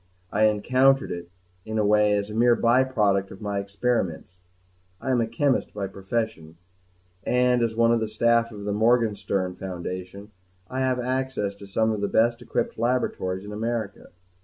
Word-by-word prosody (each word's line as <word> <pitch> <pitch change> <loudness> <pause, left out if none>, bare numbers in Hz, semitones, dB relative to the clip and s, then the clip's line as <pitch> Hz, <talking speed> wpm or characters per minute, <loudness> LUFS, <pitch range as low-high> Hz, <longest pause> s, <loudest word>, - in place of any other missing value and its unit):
I 110 +2 +3
encountered 130 +6 +3
it, 85 0 -6 0.3
in 110 +2 -4
a 105 - +2
way, 105 0 +4
as 100 +1 -1
a - - -6
mere 120 +2 +4
by 120 +3 +4
product 100 -7 +1
of 95 - -11
my 100 -2 -2
experiments; 100 -4 -2 0.6
I 130 - -2
am 125 -2 +2
a 115 - 0
chemist 130 +2 0
by 100 -1 -2
profession, 95 -4 -4 0.7
and 125 +1 +2
as 115 -1 0
one 115 0 +4
of 120 - +3
the 110 - -1
staff 115 +2 +2
of 105 -2 -9
the 100 0 -2
Morganstern 105 -4 +1
Foundation 95 +2 -6 0.4
have 130 0 0
access 130 -5 -2
to 100 - -11
some 110 +3 +1
of 105 -2 -3
the 100 - +1
best 115 +3 +2
equipped 120 - -3
laboratories 105 -6 -1
in 105 - -8
America. 110 -1 -4
110 Hz, 170 wpm, -25 LUFS, 100-120 Hz, 0.7 s, way